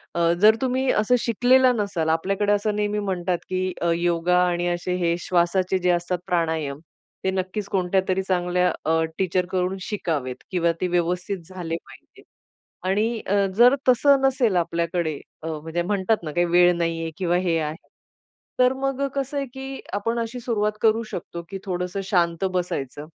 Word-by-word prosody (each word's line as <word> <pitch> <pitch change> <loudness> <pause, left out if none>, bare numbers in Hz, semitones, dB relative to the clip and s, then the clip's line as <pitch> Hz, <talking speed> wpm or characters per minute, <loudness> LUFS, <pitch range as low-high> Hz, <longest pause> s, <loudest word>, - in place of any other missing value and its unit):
अ, 170 0 +3
जर 215 +1 +7
तुम्ही 260 0 0
असं 215 +4 +3
शिकलेला 250 +3 +4
नसाल 200 -7 -1
आपल्याकडे 195 +5 +1
असं 205 +1 0
नेहमी 210 0 0
म्हणतात, 180 -3 -1
की 185 0 -1
अ, 170 - +2
योगा 175 +1 +1
आणि 175 0 0
असे 175 +1 -1
हे 170 -1 +1
श्वासाचे 180 +1 +1
जे 180 0 +1
असतात 175 +1 -1
प्राणायाम 160 -5 -1 0.5
ते 190 - +2
नक्कीच 190 +2 -3
कोणत्यातरी 190 0 +1
चांगल्या 180 -1 +1
अ, 160 0 +2 0.2
टीचरकडून 185 0 0
शिकावेत 155 - -3 0.2
किंवा 170 -2 +2
ते 185 - +1
व्यवस्थित 180 +3 -1
झाले 175 -3 -4
पाहिजे - - -17 0.7
आणि 220 +4 +1
अ, 200 0 +2
जर 245 +3 +7
तसं 275 +2 +5
नसेल 260 -6 +2
आपल्याकडे 170 -2 -1 0.2
अ, - - -4
म्हणजे 160 +2 -3
म्हणतात 200 +1 0
ना 155 - -4
काही 175 +3 +2
वेळ 175 +1 +5
नाहीये 165 -1 -2
किंवा 175 -2 +1
हे 175 -3 +1
आहे. 155 +1 -5 0.7
तर 250 +1 +5
मग 270 +1 -1
कसं 275 +1 -2
आहे, 275 - -1
की 270 0 -7
आपण 230 +4 -1
अशी 230 +2 -4
सुरुवात 210 -3 0
करू 225 +1 +3
शकतो, 170 0 -6
की 195 - -5
थोडंसं 180 +1 -3
शांत 175 -1 +1
बसायचं 150 -6 -3
185 Hz, 160 wpm, -24 LUFS, 170-210 Hz, 0.7 s, जर